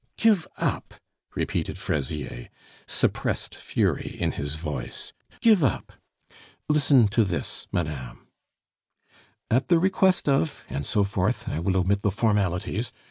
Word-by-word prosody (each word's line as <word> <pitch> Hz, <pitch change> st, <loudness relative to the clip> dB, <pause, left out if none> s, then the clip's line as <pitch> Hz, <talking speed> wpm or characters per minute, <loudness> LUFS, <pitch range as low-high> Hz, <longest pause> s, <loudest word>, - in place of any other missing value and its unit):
"Give 210 Hz, -7 st, +3 dB
up!" -, -, -2 dB, 0.4 s
repeated -, -, -2 dB
Fraisier, 70 Hz, -3 st, -3 dB, 0.4 s
suppressed -, -, -1 dB
fury -, -, -1 dB
in -, -, +1 dB
his 70 Hz, +1 st, -3 dB
voice. 75 Hz, -6 st, -5 dB, 0.3 s
"Give 215 Hz, -8 st, +5 dB
up!... 130 Hz, -, 0 dB, 0.7 s
Listen 145 Hz, -6 st, +5 dB
to 115 Hz, +3 st, +3 dB
this, 95 Hz, -4 st, -4 dB
madame: 75 Hz, -7 st, -4 dB, 1.3 s
"'At 125 Hz, +4 st, +3 dB
the 175 Hz, -, +5 dB
request 190 Hz, 0 st, +2 dB
of'... 140 Hz, +1 st, +1 dB
and 70 Hz, 0 st, -4 dB
so 105 Hz, -, +2 dB
forth 100 Hz, -2 st, -1 dB
(I 80 Hz, -, -2 dB
will 95 Hz, +3 st, +1 dB
omit 95 Hz, +2 st, +2 dB
the 105 Hz, -, +2 dB
formalities)... 105 Hz, +1 st, 0 dB
100 Hz, 125 wpm, -26 LUFS, -, 1.3 s, Give